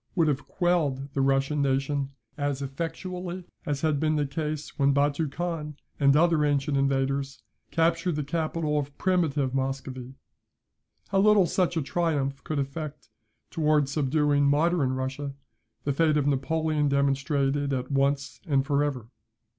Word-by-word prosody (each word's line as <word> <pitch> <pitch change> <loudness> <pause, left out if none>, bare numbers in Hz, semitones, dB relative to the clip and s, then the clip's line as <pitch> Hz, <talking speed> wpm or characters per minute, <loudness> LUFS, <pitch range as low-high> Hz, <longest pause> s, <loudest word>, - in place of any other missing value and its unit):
would 165 -4 +3
have 145 -1 -1
quelled 145 -7 0
the 135 - 0
Russian 135 +2 +2
nation 135 0 0 0.3
as 145 -1 -2
effectually, 175 +5 -5 0.2
as 145 -2 -1
had 155 -3 +1
been 155 0 +1
the 150 -1 +1
case 150 +1 -4
when 140 0 +3
Batou 145 +1 +1
Khan, 165 -3 -3 0.2
and 140 -1 +5
other 165 -1 +4
ancient 145 0 +1
invaders, 135 -1 0 0.3
captured 165 +1 +1
the 150 - -1
capital 155 0 -1
of 140 0 -6
primitive 155 -8 +1
Muscovy. 135 -1 -3 0.9
How 195 - +2
little 205 -1 +5
such 175 -1 0
a 160 - +1
triumph 140 -4 -1
could 155 - -3
effect 145 +1 -4 0.4
towards 150 -4 +2
subduing 145 0 +2
modern 145 -1 +2
Russia, 135 +2 -4 0.5
the 140 - 0
fate 155 +1 +3
of 145 - +1
Napoleon 150 +2 +1
demonstrated 140 0 +1
at 130 0 -2
once 140 +1 0
and 140 -3 +2
for 145 +1 +2
ever. 130 -6 -3
145 Hz, 145 wpm, -27 LUFS, 135-160 Hz, 0.9 s, and